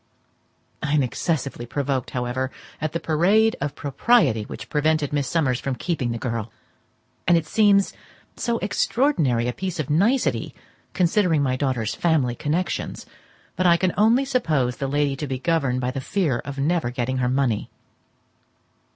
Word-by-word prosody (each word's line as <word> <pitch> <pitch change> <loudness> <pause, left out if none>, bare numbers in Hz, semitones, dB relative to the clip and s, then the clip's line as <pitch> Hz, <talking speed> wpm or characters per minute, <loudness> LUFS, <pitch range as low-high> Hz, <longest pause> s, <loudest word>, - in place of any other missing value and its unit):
I 150 -1 -1
am 150 -2 +4
excessively 135 -1 -2
provoked, 135 -1 -2
however, 125 +1 -2 0.3
at 155 -1 -1
the 170 - -1
parade 195 +9 +3
of 145 0 -2
propriety 140 - +2
which - - -8
prevented 150 -1 +1
Miss 145 -2 0
Summers 135 -7 +1
from 135 -2 -3
keeping 140 -6 -2
the 115 - -2
girl; 115 -2 -3 0.8
and 175 -1 +6
it 165 - -1
seems 200 +2 +3 0.4
so 235 -1 -1
extraordinary 165 - +1
a 125 - -1
piece 185 +1 -4
of 150 -2 -2
nicety, 220 - +1 0.4
considering 175 -4 +2
my 130 -2 +1
daughter's 130 -5 -1
family 155 -8 +1
connections, 155 +8 -2 0.5
that 185 - +3
I 170 0 +6
can 185 0 0
only 230 +6 +4
suppose 155 - 0
the 135 - -2
lady 145 0 +1
to 150 - -4
be 130 -1 -2
governed 135 -4 0
by 125 0 -1
the 135 0 -4
fear 150 -6 0
of 140 -1 -7
never 155 -1 +1
getting 125 +1 -2
her 125 -1 +1
money. 130 -5 0
145 Hz, 160 wpm, -23 LUFS, 130-175 Hz, 0.8 s, and